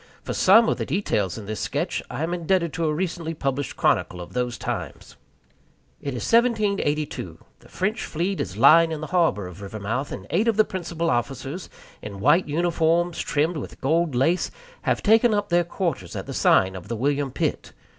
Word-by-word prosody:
For -, -, -4 dB
some 225 Hz, +5 st, +6 dB
of -, -, +1 dB
the -, -, -3 dB
details 115 Hz, -, -1 dB
in 110 Hz, -, -7 dB
this 110 Hz, +1 st, -4 dB
sketch, -, -, -2 dB
I 150 Hz, -, -4 dB
am 170 Hz, +2 st, -1 dB
indebted 170 Hz, -1 st, 0 dB
to 165 Hz, -, -1 dB
a 155 Hz, -, +1 dB
recently 165 Hz, 0 st, -3 dB
published 140 Hz, -1 st, -3 dB
chronicle 90 Hz, -, +1 dB
of 90 Hz, -, -9 dB
those 125 Hz, -1 st, -2 dB
times. -, -, -5 dB, 0.9 s
It 140 Hz, -3 st, -4 dB
is 120 Hz, -, -4 dB
1782. 205 Hz, -11 st, +1 dB, 0.2 s
The -, -, -19 dB
French 210 Hz, +4 st, -2 dB
fleet 180 Hz, +5 st, -2 dB
is 95 Hz, +1 st, -5 dB
lying 165 Hz, +7 st, +6 dB
in 155 Hz, -1 st, -4 dB
the -, -, -3 dB
harbor 165 Hz, -, +2 dB
of 90 Hz, +2 st, -10 dB
Rivermouth, 110 Hz, +7 st, -4 dB
and -, -, -6 dB
eight 205 Hz, +7 st, +2 dB
of 225 Hz, -2 st, +2 dB
the 215 Hz, -, +5 dB
principal 170 Hz, -2 st, -2 dB
officers, 135 Hz, +7 st, -3 dB, 0.3 s
in 100 Hz, -2 st, -8 dB
white 150 Hz, -, +4 dB
uniforms 170 Hz, +2 st, +1 dB
trimmed 155 Hz, +3 st, 0 dB
with -, -, -7 dB
gold 160 Hz, +1 st, +1 dB
lace, 160 Hz, +9 st, +2 dB, 0.3 s
have -, -, 0 dB
taken 225 Hz, +1 st, +5 dB
up 205 Hz, 0 st, -1 dB
their 175 Hz, 0 st, +3 dB
quarters 170 Hz, -, -3 dB
at -, -, -4 dB
the -, -, -6 dB
sign 95 Hz, 0 st, +3 dB
of 95 Hz, 0 st, -8 dB
the 115 Hz, -, -3 dB
William 140 Hz, +4 st, 0 dB
Pitt. -, -, -2 dB
160 Hz, 190 wpm, -24 LUFS, 125-180 Hz, 0.9 s, some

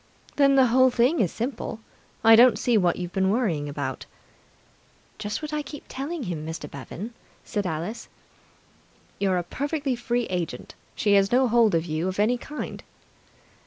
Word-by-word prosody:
"Then 275 Hz, -1 st, +4 dB
the 265 Hz, -1 st, +6 dB
whole 260 Hz, +2 st, +5 dB
thing 250 Hz, +6 st, +2 dB
is 185 Hz, -6 st, +2 dB
simple. 235 Hz, -2 st, -4 dB, 0.4 s
I 225 Hz, 0 st, +8 dB
don't 245 Hz, +2 st, +7 dB
see 245 Hz, -, +1 dB
what 180 Hz, -5 st, +3 dB
you've 180 Hz, 0 st, -6 dB
been 190 Hz, 0 st, +2 dB
worrying 185 Hz, -10 st, 0 dB
about." 140 Hz, -2 st, -5 dB, 1.1 s
"Just 210 Hz, +7 st, -4 dB
what 305 Hz, 0 st, -5 dB
I 300 Hz, -, 0 dB
keep 290 Hz, 0 st, -9 dB
telling 285 Hz, +4 st, -5 dB
him, 170 Hz, -7 st, -4 dB
Mr. 160 Hz, -1 st, -6 dB
Bevan," 170 Hz, -, -8 dB, 0.3 s
said 205 Hz, -4 st, -2 dB
Alice. 170 Hz, +7 st, -5 dB, 1.1 s
"You're 190 Hz, -2 st, +1 dB
a 175 Hz, -, -1 dB
perfectly 285 Hz, -, -2 dB
free 240 Hz, 0 st, -1 dB
agent. 170 Hz, -8 st, -4 dB, 0.2 s
She 205 Hz, -, +2 dB
has 195 Hz, 0 st, +4 dB
no 255 Hz, +1 st, +4 dB
hold 230 Hz, -4 st, +4 dB
on 165 Hz, -, +1 dB
you 160 Hz, +1 st, -2 dB
of 185 Hz, +1 st, -3 dB
any 235 Hz, +4 st, +2 dB
kind." 300 Hz, +4 st, -6 dB
220 Hz, 165 wpm, -25 LUFS, 175-255 Hz, 1.1 s, I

